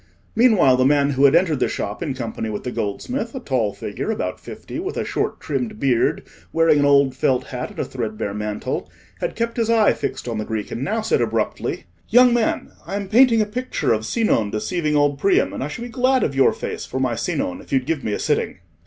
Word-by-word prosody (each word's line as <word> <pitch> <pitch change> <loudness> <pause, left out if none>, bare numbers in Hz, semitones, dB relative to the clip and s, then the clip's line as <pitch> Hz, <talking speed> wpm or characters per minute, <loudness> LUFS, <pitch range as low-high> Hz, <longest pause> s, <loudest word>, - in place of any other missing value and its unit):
Meanwhile 215 - +5
the 130 - +3
man 140 0 +3
who 135 +1 +3
had 140 - +6
entered 160 -7 +3
the - - +2
shop 105 +1 -4
in 145 -6 -2
company 115 -3 -4
with 105 -1 -4
the 125 - -3
goldsmith—a 235 - -3
tall 125 - 0
figure, 100 - -5
about 220 - -2
fifty, - - -8
with 385 +3 -4
a - - -1
short - - -2
trimmed 215 -3 -3
beard, 125 -4 +1 0.3
wearing 165 -2 +4
an 145 - +3
old 140 -2 +4
felt 130 -2 +1
hat 125 0 -5
and - - -14
a - - -1
threadbare 110 -5 -4
mantle—had 105 0 -5
kept 230 +1 -2
his 230 -1 0
eye 225 -2 +4
fixed - - -4
on 115 -2 -2
the - - -1
Greek, 110 -1 -4
and 120 - -3
now 220 +8 -1
said 215 - +1
abruptly— 115 -1 -1 0.3
"Young 245 +2 +6
man, 240 -2 0
I 195 - -5
am 200 -1 -4
painting 230 0 +5
a - - -3
picture 210 - -1
of 110 0 -2
Sinon 215 - +1
deceiving 150 - -1
old 145 -1 +2
Priam, 195 +5 +2
and - - -4
I - - -2
should 235 +10 -6
be 245 - -6
glad 255 +1 +2
of 140 - 0
your 135 0 +4
face - - -5
for 130 - -4
my 130 -2 +1
Sinon, 265 - -2
if - - -17
you'd 130 -2 +1
give 155 -2 -2
me 105 - -1
a - - 0
sitting." - - -1
145 Hz, 225 wpm, -21 LUFS, -, 0.3 s, had